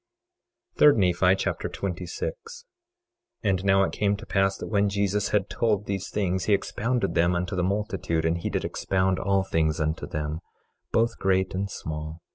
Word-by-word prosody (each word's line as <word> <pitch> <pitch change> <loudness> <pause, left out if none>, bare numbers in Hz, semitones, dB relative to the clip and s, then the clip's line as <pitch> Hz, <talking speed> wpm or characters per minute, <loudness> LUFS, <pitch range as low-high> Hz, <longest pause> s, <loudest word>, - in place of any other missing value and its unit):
3 150 - +8
Nephi 90 -2 +3
Chapter - - -2
26 90 -2 -4 1.1
26:1 - - +2
And 95 -1 +1
now 95 0 +4
it - - 0
came 100 -1 0
to - - -10
pass 95 0 +1
that - - -6
when 100 -1 +2
Jesus 100 0 0
had 100 -2 +1
told 105 -3 0
these 95 -2 -3
things 95 -3 -1
he 105 - +3
expounded 120 +5 -1
them 85 +1 +3
unto 90 +3 -2
the 90 - 0
multitude; 95 -4 -1
and 80 +1 +1
he - - -3
did - - -2
expound 95 -1 0
all 100 0 +1
things 80 -3 0
unto 80 +1 -1
them, 75 +1 -3 0.5
both 115 +1 +1
great 95 -1 +1
and 100 +1 -2
small. 80 -2 -6
95 Hz, 175 wpm, -26 LUFS, 85-100 Hz, 1.1 s, 3